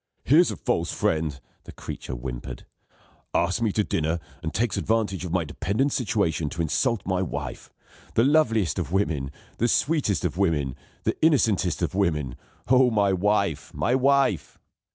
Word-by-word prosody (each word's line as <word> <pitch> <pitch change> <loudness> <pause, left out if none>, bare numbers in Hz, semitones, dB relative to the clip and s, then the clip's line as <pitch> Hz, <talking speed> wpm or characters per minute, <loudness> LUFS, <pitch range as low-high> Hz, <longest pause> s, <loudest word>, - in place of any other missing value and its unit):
"Here's 160 +7 +5
a - - -3
false 85 -9 -1
friend!" 80 -3 -1 0.3
the - - -9
creature 65 - -7
whimpered. - - -6 0.7
"Asks 85 +5 +1
me 110 -3 +2
to 105 - +2
dinner, 80 -2 -1 0.2
and 80 - -3
takes 115 +5 0
advantage 105 -5 0
of 85 - -5
my 90 -1 +1
dependent 100 - -1
situation 95 - 0
to 85 - -4
insult 115 - 0
my 95 -1 0
wife. 70 -8 -5 0.4
The 115 - +4
loveliest 115 - +2
of - - -4
women, 80 -9 0 0.3
the 120 - +3
sweetest 125 - +1
of 90 - -2
women, 75 -9 +1 0.3
the - - +1
innocentest 105 - +2
of 80 - -1
women. 75 -10 0 0.3
Oh, 130 +1 +5
my 100 -4 +2
wife! 100 -4 0
my 120 - +1
wife!" 135 +1 +2
95 Hz, 155 wpm, -25 LUFS, 80-115 Hz, 0.7 s, Here's